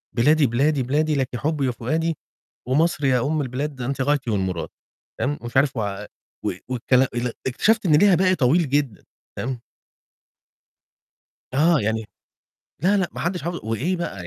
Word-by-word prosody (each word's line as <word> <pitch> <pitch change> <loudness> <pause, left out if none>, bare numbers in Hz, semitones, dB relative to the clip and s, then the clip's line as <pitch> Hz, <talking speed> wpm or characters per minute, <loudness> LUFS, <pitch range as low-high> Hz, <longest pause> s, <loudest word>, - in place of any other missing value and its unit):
"بلادي، 145 +5 +4
بلادي، 135 +4 +1
بلادي، 150 +4 +1
لِك 135 -3 0
حبي 145 0 -1
وفؤادي، 155 +7 -1 0.5
ومصر 150 +2 +1
يا 125 -2 +3
أم 155 0 0
البلاد 135 +1 -4
أنتِ 135 +2 -2
غايتي، 140 -2 0
والمراد." 95 -4 -2 0.5
تمام، 145 +2 -1
مش 120 +2 -4
عارف 135 -1 +2
و 100 -3 -3 0.4
و - - +1 0.2
والكلا 130 +1 +2
ال 120 -1 -2
اكتشفت 215 - +2
إن 155 -3 +5
ليها 195 +3 +6
باقي 185 +1 +3
طويل 150 +3 +2
جدًا، 135 -8 -1 0.3
فاهم؟ 130 -1 -3 2.0
آه، 160 +3 +4
يعني 110 +1 -1 0.8
لأ، 195 +4 +4
لأ، 190 -3 +1
ما - - -6
حدش 175 +1 -2
حافظ 175 0 -3
وإيه 125 - -1
بقى 100 - -5
140 Hz, 150 wpm, -23 LUFS, 120-160 Hz, 2.0 s, ليها